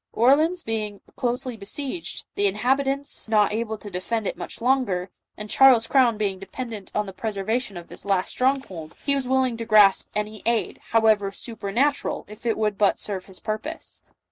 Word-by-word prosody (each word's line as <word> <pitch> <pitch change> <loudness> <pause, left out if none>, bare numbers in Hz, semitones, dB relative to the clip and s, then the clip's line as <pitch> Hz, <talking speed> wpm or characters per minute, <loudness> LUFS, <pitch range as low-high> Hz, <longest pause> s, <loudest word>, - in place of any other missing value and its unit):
Orleans 310 +9 +3
being 215 -2 -3
closely 245 -1 -2
besieged, 270 - -5
the 405 0 +2
inhabitants 275 - -1
not 210 -2 +3
able 220 0 -2
to 205 -1 -10
defend 210 +5 -2
it - - -1
much - - -7
longer, 230 -8 +1 0.3
and 210 - -5
Charles's 250 -1 +6
crown 245 -4 +3
being 200 -3 -1
dependent 210 +1 -7
on 210 - +1
the 195 - -8
preservation 215 +1 -2
of 170 - -9
this - - -9
last 195 -2 0
stronghold, 250 - -1
he 280 - +2
was 275 -2 -1
willing 260 -2 +2
to 230 - -4
grasp 210 -3 +5
any 210 0 -2
aid, 235 -1 +1
however 220 -3 +3
supernatural, 235 +7 -1
if 210 +3 -8
it 225 - +1
would 210 -2 0
but 205 -2 +4
serve 190 -3 -3
his 190 -2 -10
purpose. 220 +9 -5
220 Hz, 170 wpm, -24 LUFS, 205-260 Hz, 0.3 s, Charles's